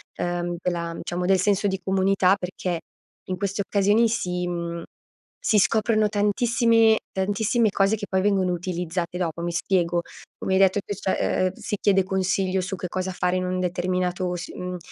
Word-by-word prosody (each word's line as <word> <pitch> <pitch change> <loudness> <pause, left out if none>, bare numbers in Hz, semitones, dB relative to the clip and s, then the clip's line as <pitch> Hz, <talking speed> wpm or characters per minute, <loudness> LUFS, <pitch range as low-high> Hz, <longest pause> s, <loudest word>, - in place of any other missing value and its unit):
ehm, 175 0 -2
della 170 -2 -2
diciamo 180 +1 -3
del 190 0 +3
senso 205 +1 +1
di 190 -1 -2
comunità 190 0 +3
perché, 180 -2 -3 0.5
in 185 - 0
queste 200 0 -2
occasioni 205 +3 +3
si 180 -5 -1
mhmm, 170 -1 -4 0.6
si 210 - +4
scoprono 215 0 +2
tantissimi 225 +2 +3
tantissime 210 +4 +1
cose 195 +2 +2
che 205 -1 -6
poi 190 - +1
vengono 190 -3 +2
utilizzate 175 0 -3
dopo. 170 -1 -2
Mi 175 - -1
spiego, 175 -2 +1 0.4
come 190 - -1
hai 190 - +4
detto 195 +1 +4
tu, 205 - -4
cioè 190 -1 0
eh 185 - -2
si 210 - -4
chiede 195 -1 +4
consiglio 190 0 0
su 185 +1 -4
che 180 0 -5
cosa 185 +1 -2
fare 180 0 0
in 185 - -1
un 185 0 -1
determinato 180 0 -1
s 170 - -6
mhmm, 180 0 -5
185 Hz, 175 wpm, -24 LUFS, 180-200 Hz, 0.6 s, si